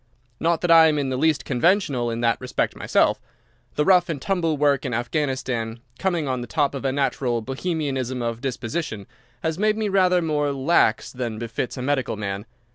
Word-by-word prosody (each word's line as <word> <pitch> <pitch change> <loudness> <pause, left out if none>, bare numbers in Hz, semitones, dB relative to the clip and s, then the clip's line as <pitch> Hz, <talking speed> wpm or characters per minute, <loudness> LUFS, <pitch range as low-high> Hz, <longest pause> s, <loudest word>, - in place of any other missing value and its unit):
Not 165 0 +1
that 175 - +1
I 165 -1 +8
am 155 -1 +1
in 140 -2 -1
the 130 - -1
least 150 0 +1
conventional 140 - +1
in 115 0 -3
that 115 +1 +1
respect 125 - -1
myself. - - +1 0.5
The 150 - +1
rough 180 -2 +4
and 155 -4 -2
tumble 165 -1 0
work 140 -2 +2
in 125 -4 -2
Afghanistan, 120 -3 -2 0.2
coming 175 -6 0
on 130 -2 -1
the 120 - -6
top 145 +1 0
of 140 - -5
a 135 - +1
natural 130 -3 0
Bohemianism 135 -2 -2
of 115 -1 -3
disposition, 130 -3 -4 0.4
has 160 +1 -1
made 215 +1 +2
me 215 -2 -1
rather 185 -2 +3
more 150 -2 0
lax 135 -4 +2
than 120 -4 -4
befits 115 +3 -4
a 125 - -4
medical 135 -4 0
man. 100 +1 -4
140 Hz, 190 wpm, -23 LUFS, 120-160 Hz, 0.5 s, I